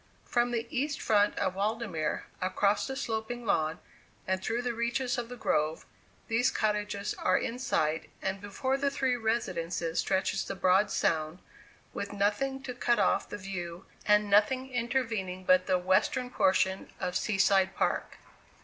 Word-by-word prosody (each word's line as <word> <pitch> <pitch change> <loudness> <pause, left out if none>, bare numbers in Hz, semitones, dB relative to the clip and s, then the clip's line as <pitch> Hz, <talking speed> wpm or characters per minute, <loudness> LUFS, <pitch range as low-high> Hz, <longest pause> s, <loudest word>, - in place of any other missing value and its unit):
From 240 0 +1
the 235 -1 -1
east 285 +3 -1
front 205 -1 +2
of 185 - 0
Waldemere, 200 -4 -1 0.2
across 200 +2 +1
the 265 - -4
sloping 235 -1 -3
lawn, 160 -5 +1 0.5
and 190 0 -1
through 235 +5 -1
the 245 -1 -1
reaches 240 +3 -1
of 235 -1 -5
the 250 - -6
grove, 155 -8 0 0.4
these 230 +2 +2
cottages 210 -1 -1
are 185 - +3
in 240 +2 -3
sight, 155 -10 0
and 190 0 -3
before 260 +6 -1
the 280 +1 +1
three 270 -3 0
residences 180 -8 -1
stretches 190 0 0
the - - -5
broad 190 +2 +3
Sound, 155 0 0 0.6
with 200 0 -4
nothing 240 +7 0
to 255 -2 -5
cut 240 -1 +1
off 195 - +2
the - - -5
view, 180 -2 -6 0.2
and 210 0 +5
nothing 235 +6 +3
intervening 225 -7 -1
but 185 0 +4
the 185 -1 +3
western 190 +8 +1
portion 190 -2 +2
of 180 - -2
Sea 210 - 0
side 190 -1 +3
Park. - - -1
205 Hz, 160 wpm, -30 LUFS, 185-240 Hz, 0.6 s, and